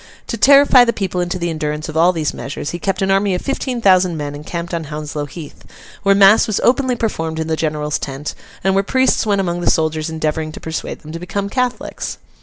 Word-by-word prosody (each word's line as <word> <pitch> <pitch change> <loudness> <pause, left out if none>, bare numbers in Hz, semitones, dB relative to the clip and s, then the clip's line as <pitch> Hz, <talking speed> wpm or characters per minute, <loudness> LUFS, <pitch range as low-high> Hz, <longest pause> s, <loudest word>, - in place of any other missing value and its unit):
To - - -1
terrify 275 +2 +7
the 235 -1 +1
people 185 -3 -2
into 175 +1 -2
the 170 -1 -2
endurance 155 -1 -3
of 155 - -7
all 170 +3 +5
these 160 -4 -2
measures, 145 +1 -5
he 175 - -5
kept 195 -1 -1
an 195 - +1
army 195 -1 +2
of 180 - -3
fifteen 260 -3 -2
thousand 185 -4 +4
men 145 -1 -4
encamped 170 +4 -6
on 165 -2 -2
Hounslow 150 0 -5
Heath, 150 +1 -10 0.4
where 195 0 +4
mass 200 +2 +6
was 215 - 0
openly 255 0 +2
performed 165 -9 -2
in 160 - -1
the 160 0 -1
General's 150 -1 -2
tent, 140 +2 -5 0.3
and 190 +1 +2
where 195 +1 +2
priests 260 +1 +2
went 200 -2 +2
among 175 -2 -2
the - - +2
soldiers 155 0 0
endeavouring 155 0 -2
to - - -8
persuade 160 0 -5
them 155 - -10
to 165 - -6
become 200 +3 -3
Catholics. 250 +2 -3
175 Hz, 220 wpm, -18 LUFS, 155-200 Hz, 0.4 s, terrify